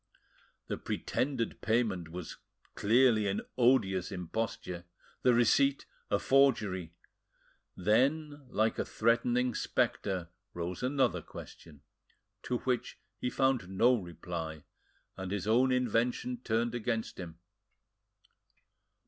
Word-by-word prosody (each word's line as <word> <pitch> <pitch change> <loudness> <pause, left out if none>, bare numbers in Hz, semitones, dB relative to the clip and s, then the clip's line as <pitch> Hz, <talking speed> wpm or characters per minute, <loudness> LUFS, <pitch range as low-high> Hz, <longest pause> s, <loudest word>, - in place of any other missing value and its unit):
The - - -3
pretended 125 -4 -2
payment 110 -7 0
was 85 0 -7 0.4
clearly 115 -1 +4
an 100 - -1
odious 115 -8 +3
imposture, 90 -1 -4 0.4
the 125 - +5
receipt 135 +4 +3 0.2
a - - +3
forgery! 105 -11 +2 0.8
Then, 140 - +1
like 110 -1 +1
a - - +2
threatening 120 +2 +1
spectre, 95 -6 -1 0.3
arose 85 +1 -4
another 130 0 +1
question, 75 -3 -12 0.6
to 125 - -1
which 125 -2 -2 0.2
he 125 - -1
found 130 -8 +1
no 115 +7 +4
reply, 85 -6 -5 0.5
and 95 -1 -5
his 100 -2 -2
own 125 +4 +4
invention 125 0 0
turned 115 +1 0
against 115 -1 -2
him. 85 -3 -7
115 Hz, 105 wpm, -31 LUFS, 90-125 Hz, 0.8 s, the